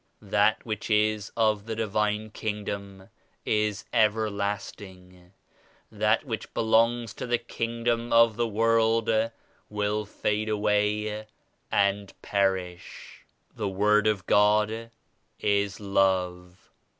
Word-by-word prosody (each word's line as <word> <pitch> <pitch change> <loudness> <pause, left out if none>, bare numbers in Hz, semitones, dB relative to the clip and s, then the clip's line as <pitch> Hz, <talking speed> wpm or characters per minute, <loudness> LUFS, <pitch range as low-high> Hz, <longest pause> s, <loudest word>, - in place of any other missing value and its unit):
79 100 -2 -17
That 105 +1 +2
which 110 -1 -4
is 105 -1 +1
of 110 -2 +1
the 110 - -3
Divine 105 0 -1
Kingdom 100 -3 -5 0.4
is 105 -1 0
ever 110 0 +2
lasting; 95 -3 -6 0.6
that - - +1
which - - -5
belongs 115 0 +2
to - - -6
the 120 0 +2
kingdom 115 0 -2
of 115 -1 +5
the 120 +1 0
world 115 +1 +2 0.6
will 105 0 -1
fade 105 +1 -2
away 105 0 0 0.4
and 100 0 0
perish." 95 -3 -2 0.3
"The 100 - -2
Word 105 +2 +3
of 100 -4 0
God 105 +3 +2 0.5
is 100 -1 0
Love. 90 -2 -1
105 Hz, 110 wpm, -27 LUFS, 100-110 Hz, 0.6 s, of